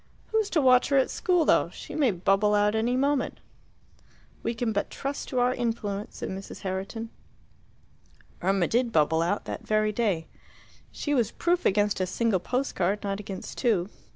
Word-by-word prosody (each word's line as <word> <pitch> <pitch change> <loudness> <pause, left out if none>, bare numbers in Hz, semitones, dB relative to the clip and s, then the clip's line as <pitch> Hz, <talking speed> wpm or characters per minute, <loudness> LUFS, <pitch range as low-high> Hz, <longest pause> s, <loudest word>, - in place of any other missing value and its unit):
"Who's 440 -2 +1
to 315 - +2
watch 255 -1 +5
her 280 - +3
at 265 - +2
school, 355 -3 +2
though? - - +3
She - - -10
may 285 -5 +3
bubble 195 +2 +2
out 205 0 +3
any 235 +3 +1
moment." 280 +1 0 1.0
"We 230 - -2
can 230 -1 -1
but 200 - -1
trust 275 +1 -4
to 255 - -3
our 245 +1 +3
influence," 220 -4 -3
said - - -4
Mrs. 195 +1 -7
Herriton. 195 +4 -4 1.3
Irma 190 -1 +2
did 240 0 +1
bubble 160 -1 +3
out, 175 +5 -1
that - - -6
very 215 0 +2
day. 200 -7 0 0.7
She 290 - -2
was 235 -6 +2
proof 350 +6 +1
against 205 +1 +2
a 185 - 0
single 210 +1 +1
post 255 +8 -2
card, 195 +4 0
not 200 0 -2
against 195 -2 -7
two. 210 -7 +1
215 Hz, 175 wpm, -27 LUFS, 195-250 Hz, 1.3 s, watch